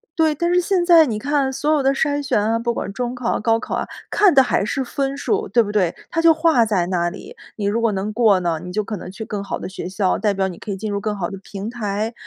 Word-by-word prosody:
对， 315 Hz, -2 st, +2 dB
但 345 Hz, +4 st, 0 dB
是 360 Hz, -, +4 dB
现 360 Hz, 0 st, +1 dB
在 335 Hz, -3 st, +7 dB
你 225 Hz, -5 st, -2 dB
看 280 Hz, +3 st, 0 dB
所 300 Hz, +3 st, 0 dB
有 300 Hz, -2 st, +3 dB
的 270 Hz, -, +3 dB
筛 290 Hz, +1 st, 0 dB
选 275 Hz, -, +1 dB
啊， 225 Hz, +2 st, +1 dB
不 235 Hz, 0 st, -1 dB
管 200 Hz, -, -4 dB
中 245 Hz, +4 st, -3 dB
考、 240 Hz, -1 st, -1 dB
高 225 Hz, +1 st, +2 dB
考 -, -, -4 dB
啊， -, -, -2 dB, 0.2 s
看 410 Hz, -5 st, +4 dB
的 265 Hz, -, +7 dB
还 245 Hz, -, 0 dB
是 265 Hz, +5 st, -1 dB
分 275 Hz, +2 st, -2 dB
数。 425 Hz, +8 st, -1 dB
对 235 Hz, -, +3 dB
不 205 Hz, -, -5 dB
对？ 185 Hz, -5 st, +1 dB
它 330 Hz, -, 0 dB
就 330 Hz, -1 st, +6 dB
画 315 Hz, -7 st, +3 dB
在 195 Hz, -5 st, +1 dB
那 175 Hz, -2 st, 0 dB
里， 420 Hz, -, -11 dB, 0.2 s
你 205 Hz, -, -4 dB
如 210 Hz, +3 st, +1 dB
果 230 Hz, -, +2 dB
能 195 Hz, +2 st, -2 dB
过 215 Hz, -4 st, +4 dB
呢， 170 Hz, -3 st, -1 dB
你 180 Hz, 0 st, -7 dB
就 215 Hz, +1 st, 0 dB
可 210 Hz, 0 st, -5 dB
能 180 Hz, -, -8 dB
去 200 Hz, +4 st, -7 dB
更 210 Hz, -2 st, -4 dB
好 -, -, -4 dB
的 -, -, -6 dB
学 185 Hz, -, -6 dB
校， 190 Hz, 0 st, 0 dB
代 210 Hz, -2 st, +1 dB
表 190 Hz, 0 st, 0 dB
你 175 Hz, -, -9 dB
可 -, -, -10 dB
以 200 Hz, -, -1 dB
进 210 Hz, +2 st, -4 dB
入 200 Hz, -, -1 dB
更 210 Hz, 0 st, -2 dB
好 175 Hz, -3 st, -3 dB
的 195 Hz, -, -7 dB
平 200 Hz, +1 st, -6 dB
台， 220 Hz, -1 st, -3 dB
225 Hz, 310 characters per minute, -20 LUFS, 200-285 Hz, 0.2 s, 在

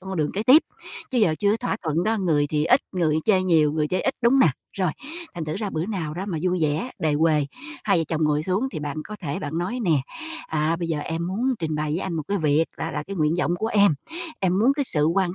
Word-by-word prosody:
trong 190 Hz, -, -10 dB
con 190 Hz, -, -3 dB
đường 150 Hz, -1 st, 0 dB
kế 205 Hz, -, -2 dB
tiếp. 265 Hz, +7 st, +7 dB, 0.5 s
Chứ 255 Hz, -, +1 dB
giờ 175 Hz, -8 st, +3 dB
chưa 200 Hz, -, +2 dB
có 215 Hz, -, +2 dB
thỏa 230 Hz, -4 st, -2 dB
thuận 165 Hz, +1 st, 0 dB
đó, 225 Hz, +1 st, +2 dB
người 155 Hz, -6 st, +2 dB
thì 150 Hz, 0 st, 0 dB
ít, 255 Hz, +9 st, +5 dB
người 160 Hz, -5 st, +1 dB
chê 190 Hz, -4 st, +3 dB
nhiều, 160 Hz, -5 st, +3 dB
người 150 Hz, -1 st, 0 dB
chê 185 Hz, -, 0 dB
ít, 270 Hz, -, 0 dB
đúng 235 Hz, -, +5 dB
hông 270 Hz, -, +5 dB
nè? -, -, +7 dB, 0.3 s
Rồi, 185 Hz, -4 st, 0 dB, 0.4 s
thành 170 Hz, -3 st, -4 dB
thử 155 Hz, -, -3 dB
ra 205 Hz, -1 st, -3 dB
bữa 160 Hz, +2 st, -2 dB
nào 170 Hz, -8 st, -3 dB
đó 180 Hz, +3 st, -4 dB
mà 170 Hz, -5 st, -2 dB
vui 180 Hz, 0 st, +1 dB
vẻ, 155 Hz, -, 0 dB
đề 155 Hz, -2 st, +1 dB
huề, 150 Hz, -1 st, +2 dB, 0.4 s
hai 200 Hz, -4 st, +3 dB
vợ 165 Hz, -, +1 dB
chồng 160 Hz, -1 st, 0 dB
ngồi 150 Hz, 0 st, +1 dB
xuống 190 Hz, +10 st, 0 dB
thì -, -, -4 dB
bạn 145 Hz, -1 st, -4 dB
có 210 Hz, -, -8 dB
thể 145 Hz, -6 st, -3 dB
bạn 155 Hz, +2 st, -4 dB
nói 190 Hz, +8 st, -2 dB
nè: 160 Hz, -6 st, +3 dB, 0.5 s
"À, 160 Hz, +1 st, 0 dB
bây 170 Hz, -1 st, -4 dB
giờ 160 Hz, -2 st, -1 dB
em 165 Hz, +3 st, -3 dB
muốn 240 Hz, +8 st, 0 dB
trình 160 Hz, -2 st, -2 dB
bày 150 Hz, 0 st, -1 dB
với 160 Hz, -, 0 dB
anh 190 Hz, -, -3 dB
một 160 Hz, -, -2 dB
cái 200 Hz, 0 st, 0 dB
việc 155 Hz, -1 st, +3 dB
là 160 Hz, +1 st, -3 dB
là -, -, -3 dB
cái 195 Hz, +5 st, -7 dB
nguyện 155 Hz, -1 st, +2 dB
vọng 175 Hz, -1 st, +1 dB
của 220 Hz, -, -1 dB
em. 205 Hz, -7 st, +4 dB, 0.5 s
Em 185 Hz, 0 st, +2 dB
muốn 250 Hz, +6 st, +4 dB
cái 285 Hz, -1 st, 0 dB
sự 150 Hz, -, +2 dB
quan 180 Hz, +1 st, +1 dB
170 Hz, 280 wpm, -24 LUFS, 155-200 Hz, 0.5 s, tiếp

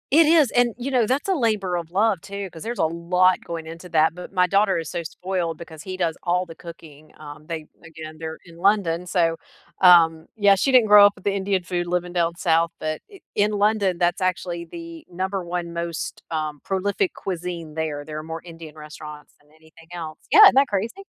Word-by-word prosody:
It 320 Hz, +3 st, +7 dB
is, 310 Hz, -6 st, +5 dB
and, 245 Hz, -1 st, +2 dB
you 255 Hz, +3 st, -4 dB
know, 245 Hz, -4 st, +2 dB
that's 275 Hz, -, -1 dB
a -, -, +3 dB
labor 215 Hz, -, 0 dB
of 170 Hz, -2 st, -6 dB
love 200 Hz, +1 st, +1 dB
too 200 Hz, +2 st, -7 dB
'cause 160 Hz, -, -10 dB
there's 235 Hz, +1 st, -5 dB
a -, -, +3 dB
lot 180 Hz, +3 st, +2 dB
going 165 Hz, -1 st, -6 dB
into 165 Hz, +2 st, -10 dB
that, 160 Hz, -1 st, +3 dB
but 180 Hz, +2 st, -10 dB
my 180 Hz, -1 st, +3 dB
daughter 195 Hz, 0 st, +2 dB
is 165 Hz, -2 st, -4 dB
so 170 Hz, -, -4 dB
spoiled 175 Hz, -1 st, -3 dB
because 160 Hz, -2 st, -11 dB
he 185 Hz, -1 st, -6 dB
does 170 Hz, -3 st, -1 dB
all 180 Hz, +1 st, +1 dB
the 165 Hz, -, -11 dB
cooking. 155 Hz, -3 st, -13 dB
Um, 150 Hz, 0 st, -11 dB
they 160 Hz, -2 st, -6 dB
again, 160 Hz, -1 st, -10 dB
they're 160 Hz, -1 st, -6 dB
in 170 Hz, -1 st, -16 dB
London, 180 Hz, -2 st, +1 dB
so, 165 Hz, -2 st, +1 dB, 0.4 s
um, 165 Hz, -3 st, +6 dB
yeah, 205 Hz, -2 st, +5 dB
she 265 Hz, +8 st, 0 dB
didn't 245 Hz, -4 st, +6 dB
grow 205 Hz, -1 st, +9 dB
up 205 Hz, -, +3 dB
with -, -, -18 dB
the 200 Hz, -, +1 dB
Indian 195 Hz, -1 st, -1 dB
food 175 Hz, 0 st, -3 dB
living 180 Hz, 0 st, -2 dB
down 170 Hz, -1 st, 0 dB
south, 165 Hz, -1 st, +1 dB
but 155 Hz, 0 st, -4 dB
i 395 Hz, -3 st, -15 dB
in 210 Hz, 0 st, +2 dB
London, 205 Hz, -3 st, +1 dB
that's 175 Hz, -1 st, +1 dB
actually 180 Hz, -2 st, -2 dB
the 165 Hz, -1 st, -10 dB
number 190 Hz, +2 st, -3 dB
one 170 Hz, 0 st, -4 dB
most, 170 Hz, -1 st, -5 dB
um, 155 Hz, -2 st, -3 dB
prolific 195 Hz, 0 st, -1 dB
cuisine 170 Hz, -4 st, -6 dB
there. 155 Hz, -2 st, -3 dB
There 155 Hz, +1 st, -7 dB
are 155 Hz, -, -5 dB
more 160 Hz, +1 st, -6 dB
Indian 165 Hz, -3 st, -11 dB
restaurants 150 Hz, -1 st, -11 dB
than 145 Hz, -, -29 dB
anything 160 Hz, +1 st, -20 dB
else. 160 Hz, -2 st, -7 dB
Yeah, 425 Hz, -, +8 dB
isn't 400 Hz, -, +8 dB
that 275 Hz, +1 st, +5 dB
crazy? 225 Hz, -, -3 dB
175 Hz, 215 wpm, -23 LUFS, 165-200 Hz, 0.4 s, grow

